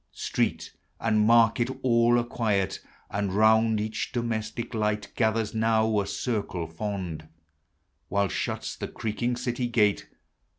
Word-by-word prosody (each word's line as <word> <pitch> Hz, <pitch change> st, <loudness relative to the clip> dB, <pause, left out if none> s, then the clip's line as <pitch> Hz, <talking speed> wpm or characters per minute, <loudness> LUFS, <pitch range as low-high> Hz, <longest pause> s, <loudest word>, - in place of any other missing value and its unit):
Street -, -, -2 dB, 0.3 s
and 110 Hz, -2 st, +2 dB
market 115 Hz, +1 st, +4 dB
all 120 Hz, -1 st, +4 dB
are 120 Hz, -, +2 dB
<|iii<'t, 100 Hz, -5 st, 0 dB, 0.3 s
And 100 Hz, -2 st, -1 dB
round 110 Hz, +1 st, +4 dB
each 110 Hz, +1 st, -3 dB
domestic 115 Hz, 0 st, -3 dB
light 105 Hz, -1 st, -1 dB
Gathers 110 Hz, -2 st, +1 dB
now 110 Hz, -1 st, +2 dB
a 100 Hz, -, -2 dB
circle 100 Hz, -7 st, -2 dB
fond, 85 Hz, -2 st, -5 dB, 0.8 s
While 100 Hz, +1 st, +1 dB
shuts -, -, -3 dB
the -, -, -5 dB
creaking 120 Hz, +3 st, -2 dB
city 120 Hz, 0 st, -2 dB
gate. 105 Hz, -4 st, +2 dB
110 Hz, 125 wpm, -27 LUFS, 105-115 Hz, 0.8 s, market